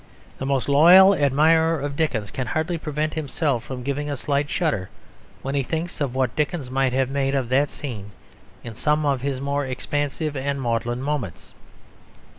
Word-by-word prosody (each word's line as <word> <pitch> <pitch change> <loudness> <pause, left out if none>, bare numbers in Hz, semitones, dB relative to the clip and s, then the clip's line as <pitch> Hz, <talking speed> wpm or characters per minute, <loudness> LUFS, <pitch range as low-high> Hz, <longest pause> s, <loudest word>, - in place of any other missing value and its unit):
The 135 - -3
most 135 -3 0
loyal 175 +7 +8
admirer 160 +2 +3
of 140 0 -4
Dickens 125 -10 -1
can 130 -3 -4
hardly 160 +6 -1
prevent 155 0 -2
himself 145 -4 -1
from 125 0 -7
giving 140 +2 -2
a 145 - -3
slight 145 +2 -1
shudder 150 - -1 0.5
when 135 - -3
he 140 - +1
thinks 160 +4 -4
of 135 -3 -1
what 130 -3 0
Dickens 150 -3 -2
might 135 -1 +1
have 130 0 0
made 135 0 0
of 130 -3 -1
that 140 +3 +2
scene 110 -8 -7 0.5
in 115 - -7
some 150 +6 0
of 140 -3 +1
his 135 -1 -2
more 140 +1 -1
expansive 145 +3 -3
and 140 +1 -2
maudlin 120 0 -2
moments. 140 - -4
140 Hz, 175 wpm, -23 LUFS, 130-150 Hz, 0.5 s, loyal